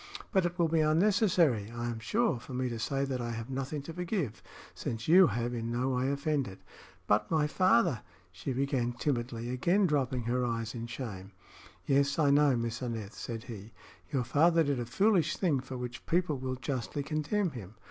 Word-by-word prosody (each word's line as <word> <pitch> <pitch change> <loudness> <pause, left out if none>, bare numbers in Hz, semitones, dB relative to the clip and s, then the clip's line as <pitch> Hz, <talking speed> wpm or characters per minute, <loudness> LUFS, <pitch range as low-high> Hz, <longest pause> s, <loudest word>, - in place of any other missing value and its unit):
"But 190 -2 +3
it 175 +1 -7
will 170 -2 +3
be 160 0 +1
unnecessary, 165 - +3
I 120 +1 -5
am 120 -2 -3
sure, 210 - +1
for 125 +2 -8
me 130 0 -1
to 115 -1 -4
say 135 +4 0
that 130 -2 -3
I 120 -1 -3
have 115 +3 -6
nothing 135 +2 -3
to 165 - -7
forgive, 175 - -3 0.3
since 115 -1 -5
you 180 +3 +8
have 120 +1 -2
in 115 -1 -3
no 125 +2 0
way 130 +1 0
offended." 140 - -2 0.4
"But 105 +1 +2
my 155 -2 +2
father 185 - +3 0.2
" 90 -1 -32
she 95 +9 -5
began, 130 -2 0
timidly, 120 -2 -2
again 175 +11 +2
dropping 135 -6 0
her 125 +2 0
eyes 115 -2 -2
in 120 -1 -5
shame. 105 -6 -7 0.5
"Yes, 140 0 +2
I 150 -3 +4
know, 145 -2 +5
Miss 115 +1 -3
Aneth," 115 -4 -4
said 115 -2 -6
he. 110 -2 -9 0.4
"Your 135 -4 +1
father 165 +7 +4
did 140 -3 0
a 120 - -3
foolish 195 - +2
thing, 160 -8 +2
for 130 0 -7
which 125 -1 -6
people 170 -5 +1
will 130 0 -3
justly 130 +2 -3
condemn 155 +6 -1
him. 110 -5 -9
130 Hz, 195 wpm, -31 LUFS, 120-155 Hz, 0.5 s, you